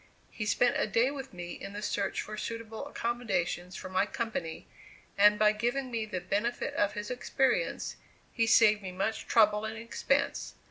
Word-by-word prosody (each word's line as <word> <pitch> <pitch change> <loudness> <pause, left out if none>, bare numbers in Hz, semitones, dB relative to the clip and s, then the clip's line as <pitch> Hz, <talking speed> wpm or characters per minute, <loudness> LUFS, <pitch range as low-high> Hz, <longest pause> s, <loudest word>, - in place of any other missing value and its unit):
He 210 - -4
spent 245 +3 +3
a - - +1
day 230 +5 +2
with 270 -2 -7
me 175 -1 -7
in 200 - -7
the 205 +1 -5
search 200 0 -1
for 215 - -7
suitable 230 +3 -5
accommodations 195 -9 -2
for - - -6
my 185 +2 +1
company, 195 -10 -4 0.5
and 210 +1 +6
by 215 -1 +5
giving 245 +5 -1
me 225 -2 -2
the 185 -4 -3
benefit 205 +7 -1
of 205 0 +1
his 210 +2 -5
experience, 265 - 0 0.4
he 230 -2 +2
saved 215 -2 +6
me 190 -2 -6
much 195 +4 -2
trouble 210 -2 +4
and 220 0 -4
expense. 230 +1 -1
215 Hz, 175 wpm, -30 LUFS, 200-235 Hz, 0.5 s, and